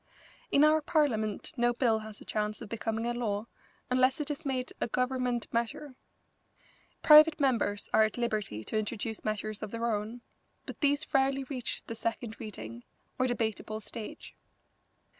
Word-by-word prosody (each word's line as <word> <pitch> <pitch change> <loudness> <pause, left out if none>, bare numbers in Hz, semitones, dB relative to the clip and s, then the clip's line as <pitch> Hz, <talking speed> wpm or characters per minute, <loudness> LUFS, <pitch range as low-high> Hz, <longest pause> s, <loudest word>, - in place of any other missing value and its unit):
In 280 - +5
our 310 +1 +5
Parliament 225 -10 0
no 240 0 +3
bill 230 -3 +2
has 215 -1 -9
a - - -13
chance 210 0 -2
of 230 - -8
becoming 225 0 -2
a 240 - 0
law 215 -3 -2 0.4
unless 255 +3 +3
it 300 0 -1
is 295 +1 -5
made 255 -2 -2
a - - +1
Government 250 -1 0
measure. 235 +5 -2 1.1
Private 305 +1 +8
members 230 -7 +1
are - - +6
at 215 +1 +2
liberty 215 - -2
to 215 - -1
introduce 220 0 -4
measures 215 0 -3
of 215 - -4
their 230 +2 -3
own, 220 +1 -2 0.4
but - - -8
these 285 -1 +2
rarely 270 0 +3
reach 255 -2 -4
the - - -5
second 230 0 -3
reading, 120 - -7 0.4
or 255 - +3
debatable 220 -2 -2
stage. 220 0 -8
235 Hz, 160 wpm, -30 LUFS, 215-260 Hz, 1.1 s, Private